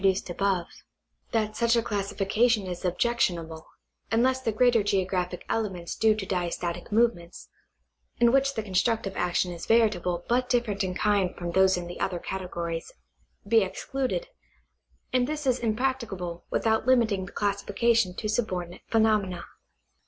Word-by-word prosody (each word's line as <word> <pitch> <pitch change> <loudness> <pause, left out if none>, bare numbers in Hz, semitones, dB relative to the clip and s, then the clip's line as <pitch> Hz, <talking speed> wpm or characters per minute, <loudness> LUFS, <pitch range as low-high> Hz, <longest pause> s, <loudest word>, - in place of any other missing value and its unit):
duced 190 -2 +1
above 190 -1 0 0.7
that 215 -2 0
such 235 +1 +3
a 230 - +2
classification 205 +1 +1
is 180 -1 -6
objectionable 175 -5 -1 0.4
unless 255 +3 +2
tbe 225 -4 -2
greater 245 -2 +5
geographic 185 -3 -1
elements 190 -6 -2
due 220 -1 +3
to 210 -3 -4
diastatic 175 -1 -3
movements 205 -6 0 0.7
(in 235 0 +5
which 275 +1 +2
the 220 - -2
constructive 205 +1 0
action 180 0 0
is 170 -1 -7
veritable 180 -6 +2
but 250 +1 +1
different 220 -5 +1
in 185 -1 -3
kind 200 -3 +1
from 175 -1 -4
those 190 +1 +4
in 175 - -4
the 175 0 -8
other 185 -2 -1
categories) 170 -2 -4 0.6
be 225 +1 +5
excluded, 270 - -2 0.9
and 250 -1 +3
this 300 0 -4
is 255 -1 +2
impractica 235 -1 -1
L)le 175 -1 -5
without 220 +2 +1
limiting 220 -7 +3
the - - -11
classification 205 0 +1
to 215 - -3
subordinate 185 -6 -2
phenomena. 210 -6 +1
205 Hz, 145 wpm, -27 LUFS, 180-235 Hz, 0.9 s, greater